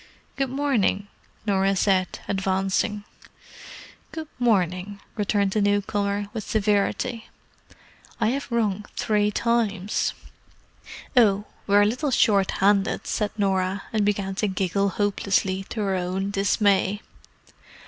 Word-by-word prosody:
"Good 270 -1 -1
morning," 245 -7 0 0.4
Norah 195 -1 +2
said, 190 -1 +1
advancing. 195 +1 0 1.1
"Good 320 -1 -6
morning," 200 -4 +1 0.2
returned 205 -2 +1
the 215 - +1
newcomer, 205 0 0
with 220 -3 -4
severity. 215 +3 0 0.9
"I 220 -2 +2
have 270 0 -3
rung 210 -3 0
three 210 -1 +1
times." 210 -3 0 1.0
"Oh—we're 205 -2 +3
a - - +4
little 255 +8 0
shorthanded," 200 -3 +2
said 210 -1 -1
Norah, 195 -1 0
and 215 -2 +2
began 200 -1 0
to 210 - +2
giggle 195 +1 0
hopelessly, 195 -1 0
to 220 - -3
her 195 -2 0
own 185 +2 -2
dismay. 200 0 +2
205 Hz, 105 wpm, -24 LUFS, 195-215 Hz, 1.1 s, a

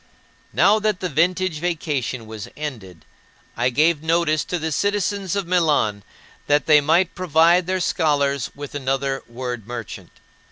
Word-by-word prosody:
Now 215 +2 +4
that 210 -3 0
the 180 - -3
vintage 175 +2 +1
vacation 150 -8 -2
was 110 -2 -8
ended, 110 - -7 0.5
I 120 +2 +1
gave 150 +4 +2
notice 160 -1 +1
to 180 - -2
the 160 -1 -3
citizens 200 +1 -1
of 200 -2 -1
Milan 150 - +1 0.4
that 145 0 +2
they 150 -2 +6
might 170 +5 +2
provide 170 0 +3
their 185 0 0
scholars 140 -5 0
with 145 -1 -8
another 135 -1 -1
word 120 -2 -6
merchant. 120 -3 -7
155 Hz, 145 wpm, -22 LUFS, 130-175 Hz, 0.5 s, they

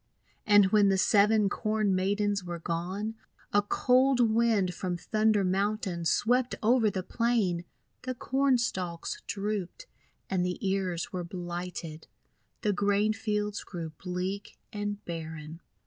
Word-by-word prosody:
And 205 -2 +6
when 205 -2 +5
the 195 - +3
Seven 210 +2 +4
Corn 215 -1 0
Maidens 200 +1 0
were 175 -1 -5
gone, 180 +6 -3 0.4
a 205 - +5
cold 255 +5 +3
Wind 220 -6 +2
from 180 0 -3
Thunder 215 +2 +2
Mountain 190 -2 -1
swept 245 +9 +2
over 230 0 +4
the 190 -2 -3
plain. 210 -7 0 0.4
The 255 0 -4
Corn 265 +1 +2
Stalks 185 - -3
drooped, 205 - -3 0.4
and 185 -2 0
the 180 0 -1
ears 190 -3 -1
were 180 -1 -2
blighted. 175 -2 -6 0.6
The 210 -2 +2
grain 205 +2 +2
fields 210 -1 -2
grew 170 -4 -6
bleak 185 +2 -4 0.2
and 205 0 -4
barren. 160 -1 -7
200 Hz, 130 wpm, -29 LUFS, 180-215 Hz, 0.6 s, And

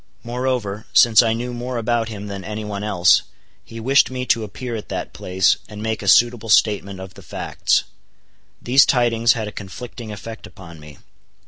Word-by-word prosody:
Moreover, 120 -4 -3
since 115 -3 +7
I 115 -2 +1
knew 120 +2 -4
more 120 +1 -4
about 115 0 -1
him 105 -2 -7
than 100 -2 -6
any 105 +1 -5
one 105 -1 -5
else, 95 -4 +4 0.4
he 115 - -10
wished 135 +5 +3
me 130 0 -4
to 115 -2 +1
appear 115 +4 -6
at 110 - -7
that - - -5
place, 95 0 +1
and 105 -1 -9
make 110 0 -3
a 100 - -6
suitable 120 +2 +4
statement 100 -3 +2
of 95 -1 -9
the - - -14
facts. - - -1 0.8
These 130 +3 +4
tidings 115 -2 +3
had 110 -2 -4
a - - -6
conflicting 110 +3 -9
effect 110 +2 -9
upon 85 -5 -13
me. 75 -1 -13
110 Hz, 185 wpm, -20 LUFS, 100-120 Hz, 0.8 s, since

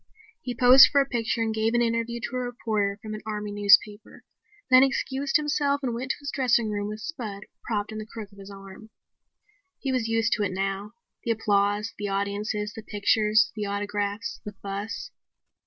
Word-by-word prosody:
He 245 - -5
posed 250 +3 +8
for 285 - +4
a 275 - +3
picture 235 -3 -1
and 220 -1 -1
gave 220 +1 0
an 240 - +3
interview 230 0 -1
to 245 - -5
a - - 0
reporter 220 -5 -2
from 215 -1 -6
an 215 - -6
army 210 -1 -4
newspaper, 205 +1 +3 0.5
then 255 0 +9
excused 270 +2 0
himself 290 -2 +1
and 245 -3 -1
went 250 +3 -4
to - - +1
his 285 - -4
dressing 240 -4 +2
room 205 0 -2
with 215 +1 -6
Spud 215 -9 -6 0.2
propped 210 -2 -2
in 215 - -5
the 215 - -7
crook 215 -2 -9
of 200 - -17
his 195 0 -11
arm. 195 +2 -12 0.9
He 270 - -2
was 250 -3 0
used 225 0 +1
to - - -1
it 190 -2 -1
now; 195 +2 -3 0.3
the - - -4
applause, 205 -1 +1
the 205 - -2
audiences, 205 +1 -2
the 220 - -8
pictures, 215 +1 +2
the 210 -2 -3
autographs, 205 0 -3
the 210 - -7
fuss. 200 +2 -5
215 Hz, 190 wpm, -26 LUFS, 205-240 Hz, 0.9 s, then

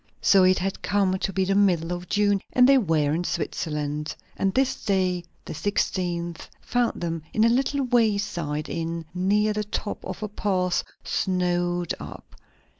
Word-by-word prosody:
So 195 -1 +5
it 185 0 +5
had 190 +1 -3
come 190 -1 +1
to 195 - -1
be 190 0 0
the 195 - +1
middle 180 -4 +2
of 175 0 -7
June, 205 -1 +2
and 250 0 +6
they 275 0 +6
were 155 - +1
in 170 +3 0
Switzerland. 150 -3 -3 0.2
And 195 - +1
this 265 +4 0
day, 185 -3 +1 0.2
the - - -6
sixteenth, 175 -2 -2
found 245 -1 0
them 165 -1 -2
in 220 - +4
a 230 - +5
little 270 +3 +1
wayside 200 - 0
inn 165 0 -3
near 205 +4 +2
the 210 0 -1
top 210 0 -4
of - - -6
a - - -1
pass, 185 -3 0 0.2
snowed 175 -2 0
up. - - -10
185 Hz, 165 wpm, -25 LUFS, 170-205 Hz, 0.2 s, and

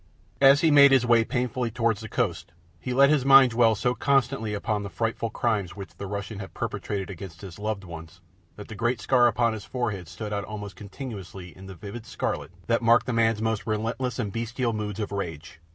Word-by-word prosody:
As 140 +1 +7
he 160 - +4
made 140 -1 +8
his 130 -2 +4
way 120 -1 +5
painfully 125 0 -2
towards 115 -2 0
the 110 - -8
coast, 90 -8 -2 0.3
he 125 - -5
let 140 +3 +5
his 150 -4 +2
mind 135 -2 +7
dwell 115 -1 +4
so 125 +4 0
constantly 135 -6 0
upon 105 0 -2
the 100 - -5
frightful 115 +1 -2
crimes 105 -6 -1
which 100 -1 -9
the 100 - -7
Russian 100 +1 -5
had 95 - -9
perpetrated 100 -3 -4
against 90 -2 -9
his 95 -3 -10
loved 105 -1 -3
ones 85 0 -10 0.4
that 105 - -10
the - - -8
great 120 +2 -1
scar 120 +2 +4
upon 115 0 +1
his 110 -2 -6
forehead 105 -9 -3
stood 105 +4 -6
out 100 0 -2
almost 105 -3 -7
continuously 95 -4 -9
in 95 +1 -12
the 95 - -9
vivid 105 +5 -9
scarlet - - -3 0.2
that 115 +1 +1
marked 115 +1 +4
the 125 - -2
man's 115 -1 +2
most 110 -1 -1
relentless 115 +3 -2
and 105 -6 -3
bestial 115 +1 -2
moods 105 -1 -4
of 105 - -3
rage. 85 -5 -6
110 Hz, 210 wpm, -26 LUFS, 100-120 Hz, 0.4 s, made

